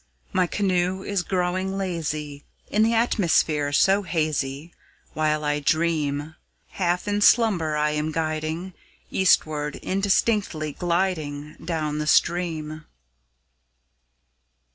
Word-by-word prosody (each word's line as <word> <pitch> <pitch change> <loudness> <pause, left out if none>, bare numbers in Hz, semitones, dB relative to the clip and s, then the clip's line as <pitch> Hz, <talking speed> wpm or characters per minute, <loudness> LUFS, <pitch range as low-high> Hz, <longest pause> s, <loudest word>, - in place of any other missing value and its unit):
My 185 -1 +2
canoe 185 -1 0
is 200 -2 -1
growing 185 +1 -1
lazy, 155 -6 -3 0.3
In 210 - +2
the 225 +1 +3
atmosphere 165 -10 +2
so 195 +7 +4
hazy, 155 -3 -2 0.4
While 155 -1 0
I 145 0 +1
dream; 155 -1 0 0.4
Half 180 0 -1
in 205 0 0
slumber 190 -10 +4
I 150 0 +1
am 150 +1 -1
guiding, 160 +3 -3 0.4
Eastward 155 -5 +2
indistinctly 195 -5 0
gliding 160 -5 -2
Down 155 -3 -2
the 150 - -2
stream. 155 -3 +1
165 Hz, 100 wpm, -24 LUFS, 150-190 Hz, 0.4 s, so